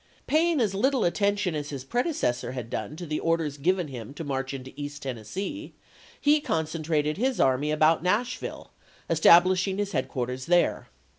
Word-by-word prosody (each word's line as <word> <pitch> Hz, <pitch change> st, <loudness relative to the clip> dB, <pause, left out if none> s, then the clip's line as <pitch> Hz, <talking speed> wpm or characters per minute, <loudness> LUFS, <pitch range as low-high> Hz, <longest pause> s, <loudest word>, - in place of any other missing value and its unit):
Paying 320 Hz, +1 st, +2 dB
as 210 Hz, -4 st, +1 dB
little 260 Hz, +5 st, +2 dB
attention 200 Hz, 0 st, +1 dB
as 145 Hz, -1 st, -4 dB
his 135 Hz, -3 st, -6 dB
predecessor 135 Hz, -, -1 dB
had 120 Hz, -3 st, -6 dB
done 110 Hz, +8 st, -4 dB
to 175 Hz, +2 st, -7 dB
the 155 Hz, -1 st, -2 dB
orders 165 Hz, -4 st, -1 dB
given 180 Hz, +3 st, +1 dB
him 130 Hz, +1 st, -8 dB
to 165 Hz, -, -5 dB
march 135 Hz, -2 st, -3 dB
into 130 Hz, -1 st, -8 dB
East 145 Hz, 0 st, -7 dB
Tennessee, 135 Hz, -, -5 dB, 0.4 s
he 295 Hz, +1 st, +4 dB
concentrated 155 Hz, -, -1 dB
his 255 Hz, +3 st, 0 dB
army 135 Hz, +3 st, +2 dB
about 155 Hz, +1 st, +3 dB
Nashville, 215 Hz, +8 st, -2 dB, 0.4 s
establish 180 Hz, +4 st, +6 dB
ing 190 Hz, 0 st, -2 dB
his 205 Hz, -1 st, -2 dB
headquarters 130 Hz, -2 st, -3 dB
there. 175 Hz, 0 st, +2 dB
160 Hz, 160 wpm, -27 LUFS, 135-200 Hz, 0.4 s, establish